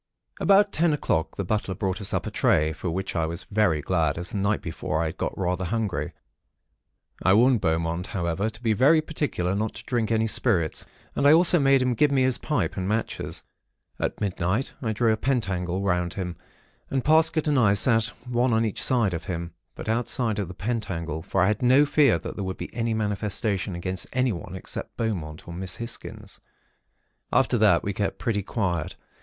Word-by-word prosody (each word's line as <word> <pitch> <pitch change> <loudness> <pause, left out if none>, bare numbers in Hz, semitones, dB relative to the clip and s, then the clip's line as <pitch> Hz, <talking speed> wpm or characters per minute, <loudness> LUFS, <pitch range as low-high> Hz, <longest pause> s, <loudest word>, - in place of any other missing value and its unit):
"About 200 +1 +4
ten 165 -2 +2
o'clock, 80 - -1
the 100 - -1
butler 100 0 -2
brought 95 +2 -2
us 100 - -2
up - - -1
a - - -4
tray; 75 +1 +2
for 85 +3 -4
which 95 +3 -3
I 80 -2 +1
was 85 +3 -5
very 100 -8 +1
glad; 80 -5 +1
as 85 +2 -5
the - - -3
night 100 +2 +1
before 80 -1 -3
I 85 - +1
had 80 - -4
got - - -3
rather 90 0 -1
hungry. 90 -7 -2 1.1
I 95 - +4
warned 120 0 +4
Beaumont, 85 +1 -1
however, 90 +3 -1
to 110 +2 -12
be 110 -2 +2
very 140 +9 +5
particular 145 - -2
not 105 +2 -2
to - - -8
drink 120 -4 -1
any 110 0 +2
spirits, 100 -8 +1 0.3
and 140 - +3
I 145 - +8
also 175 +1 +6
made 135 -2 +4
him 125 -1 +1
give 145 +6 +3
me 135 -2 +3
his 130 -1 +1
pipe 150 -1 -1
and 95 -1 -2
matches. 110 +2 -3 0.6
At - - -2
midnight, 95 +4 -1
I 115 -4 -1
drew 110 +1 +2
a - - -1
pentacle 95 -8 -1
round 90 -3 0
him, 90 -3 -4 0.5
and 135 -2 -1
Parsket 160 0 +3
and 145 -3 +3
I 100 -4 +4
sat 115 +2 +4 0.2
one 120 0 +1
on 110 0 +2
each 110 - -3
side 115 -7 +2
of 80 -1 -4
him; 85 -2 -4 0.2
but - - -8
outside 115 -1 0
of 100 - -2
the 90 - -9
pentacle; 90 -8 -3
for 95 +2 0
I - - +3
had 105 -1 0
no 130 +4 +5
fear 145 - +4
that 80 - -6
there 100 - -4
would 95 0 -4
be - - -7
any 115 -1 -1
manifestation 105 -1 -1
made - - -4
against 95 +1 -4
anyone, 120 -8 -1
except 95 - -6
Beaumont 85 -9 -3
or 85 - -7
Miss 90 +1 -4
Hisgins. 115 +1 -7 0.9
"After - - +3
that, - - +4
we 100 - -2
kept 100 +1 -2
pretty 105 -3 -1
quiet. 90 -6 -2
105 Hz, 200 wpm, -25 LUFS, 90-120 Hz, 1.1 s, I